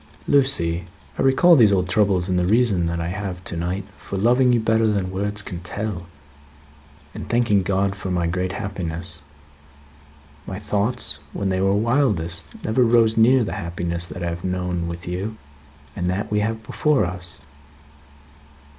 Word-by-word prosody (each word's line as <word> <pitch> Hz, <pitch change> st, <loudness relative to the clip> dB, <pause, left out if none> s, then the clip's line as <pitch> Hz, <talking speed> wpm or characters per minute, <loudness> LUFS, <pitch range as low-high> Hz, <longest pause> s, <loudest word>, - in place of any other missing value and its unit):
"Lucie, 85 Hz, -12 st, +3 dB, 0.3 s
I -, -, +2 dB
recall 135 Hz, +7 st, +6 dB
these 115 Hz, -8 st, +6 dB
old 90 Hz, -2 st, +1 dB
troubles 95 Hz, -1 st, +2 dB
in 95 Hz, -, 0 dB
the 90 Hz, 0 st, +1 dB
reason 105 Hz, -5 st, +3 dB
that 85 Hz, 0 st, -2 dB
I 85 Hz, 0 st, -2 dB
have 95 Hz, -1 st, -5 dB
to 85 Hz, -, -4 dB
night 90 Hz, +4 st, -3 dB
for 100 Hz, -, -6 dB
loving 125 Hz, +5 st, +4 dB
you 120 Hz, -, +3 dB
better 110 Hz, 0 st, +2 dB
than 100 Hz, -3 st, 0 dB
words 100 Hz, +2 st, -2 dB
can 90 Hz, -, -6 dB
tell, 90 Hz, 0 st, -5 dB, 1.1 s
and -, -, -8 dB
thanking 115 Hz, -4 st, +3 dB
God 95 Hz, +1 st, 0 dB
for 95 Hz, -1 st, -6 dB
my 90 Hz, -2 st, 0 dB
great 90 Hz, +2 st, -1 dB
happiness. 85 Hz, -4 st, -5 dB, 1.3 s
My 95 Hz, -, -5 dB
thoughts, 105 Hz, -, -2 dB
when 100 Hz, -1 st, -2 dB
they 95 Hz, 0 st, 0 dB
were 95 Hz, +1 st, +2 dB
wildest, 100 Hz, -, 0 dB, 0.2 s
never 115 Hz, +4 st, +2 dB
rose 115 Hz, -1 st, +4 dB
near 120 Hz, +3 st, +5 dB
the 105 Hz, -, -4 dB
happiness 85 Hz, 0 st, -3 dB
that 90 Hz, -, -7 dB
I 85 Hz, -, -1 dB
have 85 Hz, +1 st, -6 dB
known 90 Hz, -2 st, -2 dB
with 85 Hz, 0 st, -7 dB
you, 95 Hz, +5 st, -4 dB, 0.6 s
and 90 Hz, 0 st, -1 dB
that 100 Hz, +4 st, -2 dB
we 105 Hz, -, +2 dB
have 110 Hz, +1 st, -2 dB
before 150 Hz, +3 st, +1 dB
us." 85 Hz, -1 st, -5 dB
95 Hz, 165 wpm, -22 LUFS, 85-110 Hz, 1.3 s, recall